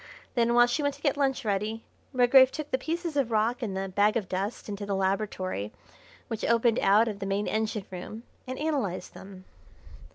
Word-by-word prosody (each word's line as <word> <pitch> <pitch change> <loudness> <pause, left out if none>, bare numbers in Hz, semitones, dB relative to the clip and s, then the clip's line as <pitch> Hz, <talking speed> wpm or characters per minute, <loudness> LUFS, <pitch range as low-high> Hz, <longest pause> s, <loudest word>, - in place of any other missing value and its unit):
Then, 235 -1 +2
while 240 0 +7
she 245 +5 -1
went 285 -1 0
to 285 - -19
get 285 -3 +2
lunch 270 -3 0
ready, 210 +2 -1 0.3
Redgrave 260 0 +6
took 305 0 -6
the 260 - +1
pieces 330 +2 -3
of 275 -5 +1
rock 230 +3 +1
and 200 -5 -3
the 195 0 -2
bag 205 +4 +2
of 205 -5 -3
dust 195 +5 -3
into 205 -1 -5
the 200 -1 -2
laboratory 190 - -2 0.6
which 225 - -5
opened 235 0 +3
out 210 +4 +4
of 210 -3 -4
the 195 - -4
main 200 +1 0
engine 215 -2 -2
room 190 +5 -7 0.2
and 255 0 -4
analysed 275 - -2
them. 190 -1 -12
220 Hz, 195 wpm, -28 LUFS, 195-260 Hz, 0.6 s, while